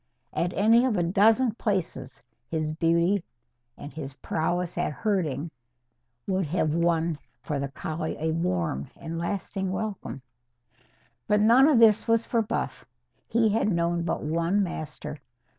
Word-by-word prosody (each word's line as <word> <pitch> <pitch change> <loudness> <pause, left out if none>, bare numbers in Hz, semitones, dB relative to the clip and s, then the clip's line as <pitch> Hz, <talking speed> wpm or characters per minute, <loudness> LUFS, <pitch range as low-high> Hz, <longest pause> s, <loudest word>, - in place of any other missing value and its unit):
At 175 - 0
any 225 +4 +5
of 235 -6 +1
a 175 - +2
dozen 220 +7 +4
places 190 - -3 0.2
his 155 -1 -2
beauty 170 +3 +2 0.5
and 145 - -9
his 140 -4 -7
prowess 175 +4 -2
at 175 -2 -1
herding 160 -3 -1 0.7
would 190 -3 0
have 155 -1 0
won 170 -1 +1 0.2
for 150 -3 -2
the 140 - -2
collie 155 +3 -4
a 160 +1 0
warm 90 - -1
and 165 0 -5
lasting 190 +1 -3
welcome. 195 -9 -4 1.0
But 210 0 +3
none 235 +6 +6
of 300 -5 +4
this 225 -1 +5
was 230 0 +3
for 230 - +1
Buff. 215 - -3 0.4
He 225 -1 +3
had 210 0 +1
known 170 0 +1
but 170 - -2
one 170 +6 +1
master. 150 -3 -6
170 Hz, 140 wpm, -27 LUFS, 155-205 Hz, 1.0 s, none